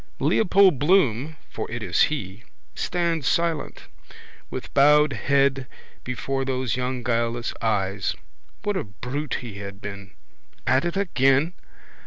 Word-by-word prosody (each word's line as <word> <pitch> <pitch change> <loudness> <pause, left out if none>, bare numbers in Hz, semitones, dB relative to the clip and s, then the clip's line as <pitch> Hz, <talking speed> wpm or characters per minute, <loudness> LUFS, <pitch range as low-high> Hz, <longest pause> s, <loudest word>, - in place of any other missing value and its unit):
Leopold 190 - +4
Bloom 150 - +2
(for - - -6
it 120 -1 -5
is 85 -4 +1
he) 110 -7 -5 0.3
stands 170 -5 -1
silent, 170 -3 0 0.7
with - - -7
bowed 150 +1 +5
head 135 -2 +1 0.4
before 135 +2 -2
those 130 -3 -1
young 125 0 -2
guileless 115 0 -1
eyes. 100 -4 0 0.5
What 205 -1 0
a - - -1
brute 125 +7 -4
he 110 -6 -8
had 100 -1 -8
been! 100 -1 -8 0.5
At 130 +5 +3
it 175 +2 -2
again? 145 -4 +2
130 Hz, 125 wpm, -24 LUFS, 115-150 Hz, 0.7 s, bowed